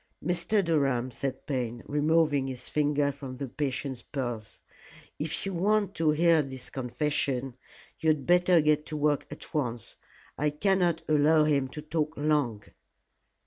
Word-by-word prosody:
"Mr. 180 +3 +1
Durham," 135 -6 +1
said 130 +1 -4
Payne, 120 -4 -3
removing 150 -2 +2
his 130 -2 -6
finger 145 -1 +1
from 135 -2 -8
the 135 +2 -5
patient's 135 -1 -3
pulse, 120 -6 -5 0.6
"if 150 +5 -2
you 195 - -3
want 200 +2 +1
to 160 -4 +1
hear 165 +1 +4
this 130 -3 -7
confession 130 0 -1 0.4
you 160 - +1
had 150 -4 +1
better 180 -1 +5
get 150 0 +2
to 155 - -4
work 145 -1 +1
at 150 - -8
once. 120 -7 -3 0.4
I 150 +1 +2
cannot 180 +2 +1
allow 155 +1 +4
him 140 -3 +2
to 150 +3 -8
talk 155 0 -1
long." 145 -8 0
150 Hz, 145 wpm, -28 LUFS, 130-160 Hz, 0.6 s, better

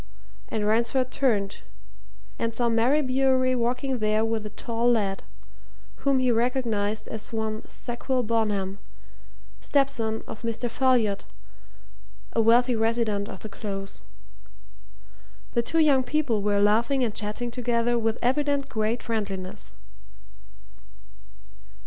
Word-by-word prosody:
And 215 -1 -1
Ransford 235 +4 +2
turned 210 -8 0 0.8
and 230 - 0
saw 235 +1 0
Mary 245 +7 +3
Bewery 260 0 +2
walking 250 +2 -1
there 215 +1 +2
with 225 -1 -1
a - - -8
tall 235 +2 -1
lad, 205 -5 +1 0.8
whom 275 -1 +2
he 255 -1 +3
recognized 225 -3 0
as 220 -1 -6
one 220 -1 -2
Sackville 250 +1 -2
Bonham, 205 -4 0 0.8
stepson 245 -6 0
of - - -8
Mr. 230 +1 -2
Folliot, 235 -6 +2 1.1
a 230 - +3
wealthy 240 +2 +4
resident 225 -2 0
of 190 - -9
the 215 - -7
Close. 195 -1 -6 1.5
The 235 - +3
two 325 +8 -1
young 290 -5 +5
people 265 -6 0
were 205 0 +1
laughing 230 +6 +3
and 225 -4 0
chatting 215 +3 -2
together 240 -1 0
with 225 0 0
evident 280 +2 +1
great 220 +2 -1
friendliness. 195 - -3
230 Hz, 120 wpm, -26 LUFS, 215-255 Hz, 1.5 s, young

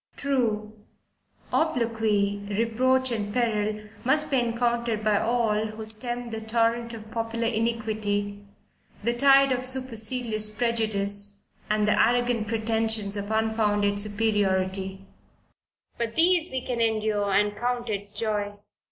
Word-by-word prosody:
True 220 -6 -1 0.7
obloquy, 225 -9 +1
reproach, 250 +5 +2
and 205 -3 -2
peril, 215 -3 -1 0.2
must 300 +5 +1
be 270 - +3
encountered 235 -2 0
by 215 -1 +3
all 220 -2 +1
who 215 0 -7
stem 240 +2 +2
the 225 -1 -5
torrent 230 +1 0
of 220 -1 -11
popular 230 0 -2
iniquity, 215 -3 -1 0.6
the 235 +2 +1
tide 275 +2 +5
of 255 0 0
supercilious 245 -3 -1
prejudice, 205 -3 -1 0.3
and 210 0 +2
the 210 - +4
arrogant 240 -1 +1
pretensions 220 -2 0
of 205 0 -4
unfounded 215 -2 +1
superiority; 195 -2 0 0.9
but 230 -1 -2
these 345 0 +3
we 260 -1 -4
can 240 -2 -2
endure, 215 -2 +1
and 205 +1 +2
count 240 +2 -2
it 205 -1 -4
joy. 210 -2 -2
220 Hz, 120 wpm, -26 LUFS, 210-240 Hz, 0.9 s, tide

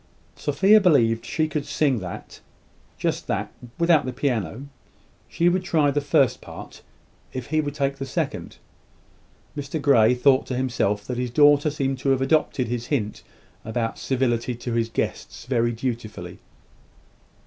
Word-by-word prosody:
Sophia 190 +10 +4
believed 115 - +3
she 155 -1 -1
could 150 -1 -3
sing 140 -6 +1
that 90 -3 -8 0.6
just - - -2
that - - -2 0.3
without 170 -3 +4
the 130 - -3
piano. 125 - -2 0.6
She 170 - +1
would 180 +1 +2
try 155 -5 +2
the 145 +1 0
first 140 -3 +2
part, - - -11 0.5
if 130 -2 -6
he 155 0 +3
would 145 -1 -5
take 140 -1 -1
the 135 - -4
second. - - -3 1.0
Mr 145 +2 -4
Grey 125 -5 +4
thought 130 +1 +3
to 125 - -3
himself 115 -5 -1
that 125 -1 -4
his 125 0 -2
daughter 145 +3 +5
seemed 135 -3 -2
to 135 - -1
have 135 -1 +2
adopted 135 -3 +1
his 120 0 -3
hint 110 -8 -2 0.4
about 115 +1 -3
civility 125 -2 0
to 120 0 -5
his 115 0 0
guests - - -4
very 120 -2 +1
dutifully. 110 -7 -5
130 Hz, 150 wpm, -24 LUFS, 120-145 Hz, 1.0 s, daughter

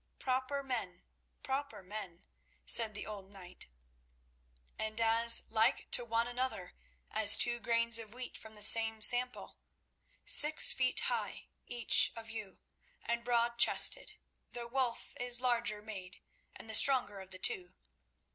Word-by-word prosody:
"Proper 260 +2 -6
men; 260 -2 -9 0.4
proper 275 -4 -8
men," 185 -3 -12 0.4
said 220 -3 +4
the 205 - -10
old 200 -3 -13
knight; 185 -2 -14 1.1
"and 220 +1 -7
as 230 +1 +1
like 225 +4 -4
to 245 - +1
one 230 0 -5
another 245 -7 -8 0.4
as 215 -1 +6
two 240 0 0
grains 230 0 0
of 220 -2 -12
wheat 250 +2 -13
from 220 0 -15
the 210 - -3
same 225 0 +5
sample. 250 +1 +1 0.7
Six 300 +1 +7
feet 255 -1 -2
high, - - -7 0.2
each 240 -2 +1
of 225 -1 -12
you, 210 -4 -11 0.5
and 235 0 -6
broad 235 0 -4
chested, - - +2 0.4
though 240 -1 -9
Wulf 245 -1 -7
is 245 0 -1
larger 235 -4 -4
made 190 -4 -13 0.4
and - - -16
the 220 - -10
stronger 225 -5 +2
of 190 -1 -15
the 185 - -9
two. 185 0 -2
230 Hz, 140 wpm, -29 LUFS, 215-245 Hz, 1.1 s, Six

